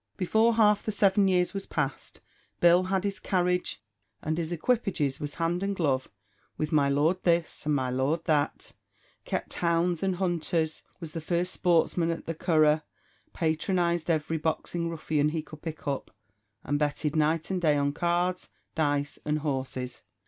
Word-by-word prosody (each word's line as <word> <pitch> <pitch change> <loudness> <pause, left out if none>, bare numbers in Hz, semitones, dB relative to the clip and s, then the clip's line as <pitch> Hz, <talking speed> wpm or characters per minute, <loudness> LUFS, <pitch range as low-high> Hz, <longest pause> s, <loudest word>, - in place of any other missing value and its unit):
Before 220 +5 +3
half 210 -2 +4
the 215 - -2
seven 200 -1 +3
years 180 0 +2
was 195 -1 -4
passed, 135 -3 -3 0.4
Bill 175 +1 +5
had 190 0 0
his 200 -1 -2
carriage, 180 - 0 0.4
and 155 - -1
his 165 0 -3
equipages; 175 - 0
was 145 -1 -4
hand 170 +2 0
and 200 0 -1
glove 135 -7 0 0.5
with 155 0 -2
my 145 -3 +3
Lord 155 +6 +2
This, 170 -3 0
and 150 - +3
my 130 -2 0
Lord 135 +6 0
That; 150 -2 0 0.5
kept - - -3
hounds 170 0 +1
and 190 -1 0
hunters; 170 -3 -1 0.2
was 165 -3 -6
the 165 - -4
first 175 +3 -1
sportsman 170 -1 +2
at 165 - -3
the 165 - -2
Curragh; 155 -2 +3 0.5
patronised 170 +1 0
every 160 0 0
boxing 165 +2 -2
ruffian 155 -2 0
he 155 0 -3
could 155 -1 -12
pick 160 -2 -7
up; 140 -1 -2 0.5
and 145 +1 -1
betted 150 +1 -1
night 160 +3 +1
and 185 -1 -1
day 150 -3 +3
on 140 0 +1
cards, 175 +3 0 0.2
dice, 145 -3 0
and 150 0 0
horses. 130 -4 -3
165 Hz, 165 wpm, -28 LUFS, 150-180 Hz, 0.5 s, Bill